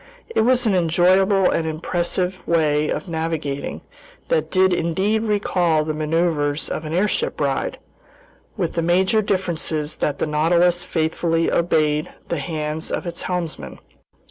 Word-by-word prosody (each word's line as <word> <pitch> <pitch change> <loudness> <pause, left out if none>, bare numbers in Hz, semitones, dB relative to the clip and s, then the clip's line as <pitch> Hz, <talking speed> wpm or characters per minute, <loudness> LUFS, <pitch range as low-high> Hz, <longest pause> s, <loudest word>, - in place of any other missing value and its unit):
It - - +4
was 250 +2 +3
an 215 - +3
enjoyable 185 +3 +3
and 160 - 0
impressive 175 +3 -2
way 155 -2 +2
of - - -3
navigating 160 -4 -3 0.5
that - - +1
did 190 -1 +3
indeed 190 +6 0
recall 180 -7 +1
the 155 - -2
maneuvers 155 -1 0
of 155 - -4
an 155 - -5
airship 210 - 0
ride, - - -1 0.8
with 175 -5 -1
the 170 - 0
major 185 +6 +3
difference 185 -5 -1 0.3
that 145 - -1
the - - 0
Nautilus 170 +3 +2
faithfully 165 0 0
obeyed 155 -3 +1 0.2
the 170 - -1
hands 155 +1 -3
of - - -2
its 170 -1 -5
helmsman. 175 -3 -4
170 Hz, 140 wpm, -21 LUFS, 155-185 Hz, 0.8 s, It